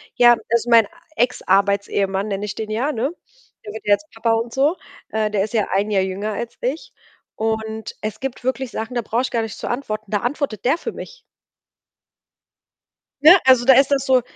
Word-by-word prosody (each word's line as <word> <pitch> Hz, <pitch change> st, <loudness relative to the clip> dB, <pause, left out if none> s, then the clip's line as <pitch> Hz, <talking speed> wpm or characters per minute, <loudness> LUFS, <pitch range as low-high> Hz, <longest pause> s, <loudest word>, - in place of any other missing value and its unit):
Ja, 240 Hz, 0 st, +7 dB, 0.2 s
also, 235 Hz, +1 st, +1 dB
mein 230 Hz, -1 st, +6 dB, 0.3 s
Ex-Arbeits-Ehemann, 200 Hz, -3 st, +1 dB
nenne 200 Hz, 0 st, -3 dB
ich 210 Hz, -, -5 dB
den 215 Hz, -1 st, -5 dB
ja, 255 Hz, +8 st, 0 dB
ne, 255 Hz, +6 st, -1 dB, 0.5 s
der 210 Hz, -, -7 dB
wird 220 Hz, -, -9 dB
ja 205 Hz, -, +4 dB
jetzt 310 Hz, +9 st, -17 dB
Papa 225 Hz, 0 st, 0 dB
und 230 Hz, +1 st, -2 dB
so, 290 Hz, +7 st, +2 dB, 0.3 s
äh, 215 Hz, -1 st, 0 dB
der 200 Hz, -2 st, +1 dB
ist 215 Hz, +2 st, -6 dB
ja 220 Hz, -3 st, +1 dB
ein 200 Hz, +2 st, 0 dB
Jahr 195 Hz, -2 st, +2 dB
jünger 195 Hz, +3 st, -3 dB
als 235 Hz, +3 st, -5 dB
ich, 265 Hz, +7 st, -4 dB, 0.4 s
und 220 Hz, 0 st, -3 dB
es 215 Hz, 0 st, -4 dB
gibt 265 Hz, -2 st, -5 dB
wirklich 260 Hz, -1 st, -2 dB
Sachen, 225 Hz, +3 st, -5 dB
da 240 Hz, -, +1 dB
brauche 230 Hz, +2 st, -1 dB
ich 255 Hz, -, -3 dB
gar 230 Hz, -, 0 dB
nicht 220 Hz, -2 st, -6 dB
zu -, -, -5 dB
antworten, 215 Hz, -5 st, -4 dB
da 205 Hz, -, +1 dB
antwortet 250 Hz, -3 st, -3 dB
der 275 Hz, +7 st, +3 dB
für -, -, -6 dB
mich. -, -, -10 dB, 2.0 s
Ne, 330 Hz, +5 st, +9 dB
also, 255 Hz, -2 st, +6 dB
da 265 Hz, -, +7 dB
ist 270 Hz, +2 st, +4 dB
das 275 Hz, -1 st, +1 dB
so, 255 Hz, -2 st, +4 dB
225 Hz, 200 wpm, -21 LUFS, 210-260 Hz, 2.0 s, Ne